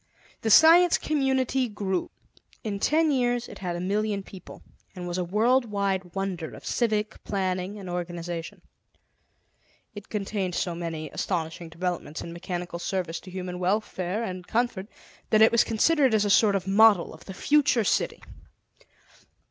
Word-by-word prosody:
The 225 - -1
Science 335 +8 +7
Community 265 -3 0
grew. 195 -3 -2 0.5
In 205 -3 -3
ten 310 +6 +2
years 245 -2 0
it - - -11
had 180 -2 -3
a - - -4
million 200 +2 -1
people, 190 -2 -12 0.3
and 180 -1 -6
was 175 +1 -3
a - - 0
worldwide 200 -3 0
wonder 190 -4 -3
of - - -13
civic 215 -3 -1
planning 190 0 -2
and 195 -2 -9
organization; 175 -1 -5 1.3
it 205 -1 -10
contained 195 -3 -2
so 175 - -1
many 165 -2 -5
astonishing 165 -2 -3
developments 170 -2 -4
in 170 - -7
mechanical 175 0 -5
service 175 -2 -3
to 185 - -13
human 180 -1 -5
welfare 190 +1 -1
and 185 -4 -6
comfort 225 -4 -1 0.4
that 215 0 +5
it 220 - +6
was 235 - +4
considered 265 +2 +3
as 210 -1 +2
a 205 - +1
sort 205 0 +5
of 190 -2 -1
model 200 -1 +5
of - - -14
the 190 - -8
future 280 -2 +3
city. - - 0
195 Hz, 150 wpm, -26 LUFS, 180-225 Hz, 1.3 s, Science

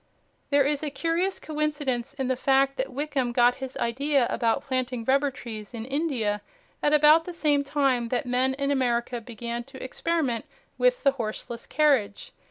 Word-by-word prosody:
There 280 -1 +4
is 290 0 0
a 305 - -2
curious 335 +6 -1
coincidence 290 -4 -2
in 265 -2 -2
the 260 - +1
fact 270 +1 +2
that 260 +1 -2
Wickham 270 -2 -1
got 245 0 +4
his 265 0 -5
idea 275 +3 +1
about 230 -2 +1
planting 255 -3 -2
rubber 275 +3 +3
trees 225 -4 -8
in 225 -1 -5
India 260 -8 -1 0.4
at 295 - +2
about 305 +2 +6
the 355 - -6
same 295 -4 +2
time 275 -4 +1
that 250 +1 -1
men 255 +2 +1
in 280 +1 -1
America 240 -2 0
began 235 +1 -5
to 270 0 -10
experiment 265 -3 -1 0.3
with - - +2
the 275 - +5
horseless 235 -1 -6
carriage. 255 -8 +1
265 Hz, 170 wpm, -26 LUFS, 240-290 Hz, 0.4 s, about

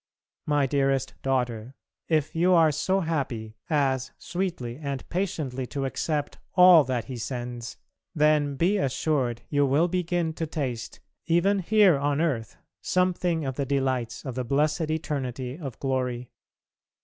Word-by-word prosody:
My 145 -2 +3
dearest 135 -1 0
daughter, 125 -2 -1 0.3
if 155 -3 +1
you 180 +3 +4
are 160 -2 +5
so 190 +6 0
happy 125 -10 -3
as 135 -4 +1
sweetly 175 -10 -4
and 140 -3 -5
patiently 150 -9 -2
to 135 +1 -3
accept 145 +2 -2 0.2
all 180 -3 +8
that 125 -2 -2
He 130 - -6
sends, 120 -1 -5 0.4
then 150 -2 +3
be 180 +8 +2
assured 130 - 0
you 145 -1 +2
will 140 +5 +3
begin 175 -2 -1
to 160 0 -3
taste 130 -7 -4 0.3
even 180 +4 +3
here 195 -4 +4
on 145 +1 0
earth 125 -9 -1 0.2
something 180 -3 +1
of 130 -1 -3
the 140 - 0
delights 130 -4 -1
of 130 - -4
the 130 +1 -2
blessed 150 +5 +1
eternity 135 -5 -3
of 135 -8 -6
glory. 125 -2 -2
140 Hz, 140 wpm, -26 LUFS, 130-165 Hz, 0.4 s, all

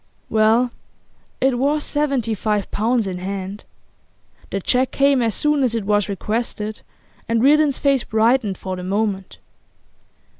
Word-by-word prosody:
Well, 225 +3 +3 0.7
it 260 -2 +2
was 290 +3 +1
seventy 275 -6 0
five 210 -1 -1
pounds 230 +1 +1
in 185 -2 -4
hand. 195 +2 -5 0.8
The 195 - -2
cheque 250 +7 +1
came 275 -1 +3
as 225 -3 0
soon 295 -1 +1
as 245 -3 +1
it 220 -3 -2
was 205 0 +1
requested, 215 +1 -3 0.5
and 230 0 +2
Reardon's 295 0 +4
face 275 -3 +2
brightened 220 -2 +1
for 185 -1 -5
the 180 - -7
moment. 195 0 -2
225 Hz, 140 wpm, -21 LUFS, 205-265 Hz, 0.8 s, Reardon's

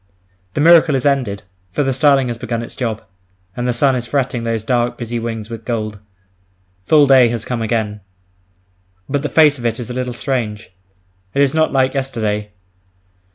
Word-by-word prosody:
The 145 - 0
miracle 165 -2 +6
is 130 - -1
ended, 125 -9 0 0.3
for 145 - 0
the 135 -1 0
starling 135 -1 +3
has 120 -1 -5
begun 115 -1 -3
its - - -9
job; 115 -4 -3 0.5
and 120 0 -2
the - - +2
sun 130 +3 +2
is 120 -1 -3
fretting 130 -2 -1
those 115 -2 -2
dark, 120 +1 0
busy 120 0 -4
wings 115 -1 -5
with 115 -1 -7
gold. 110 -3 -3 0.9
Full 150 -2 +6
day 135 -3 +6
has 115 -2 -4
come 120 -2 -3
again. 110 -2 -2 1.1
But 140 0 -1
the 150 - -3
face 150 -3 +4
of 120 - -7
it 115 +1 -3
is 120 0 -5
a - - -4
little 125 0 -3
strange, 115 -7 -3 0.6
it 140 - +3
is 135 - +1
not 160 0 +2
like 130 -1 +2
yesterday. 110 -6 -2
120 Hz, 185 wpm, -18 LUFS, 115-135 Hz, 1.1 s, miracle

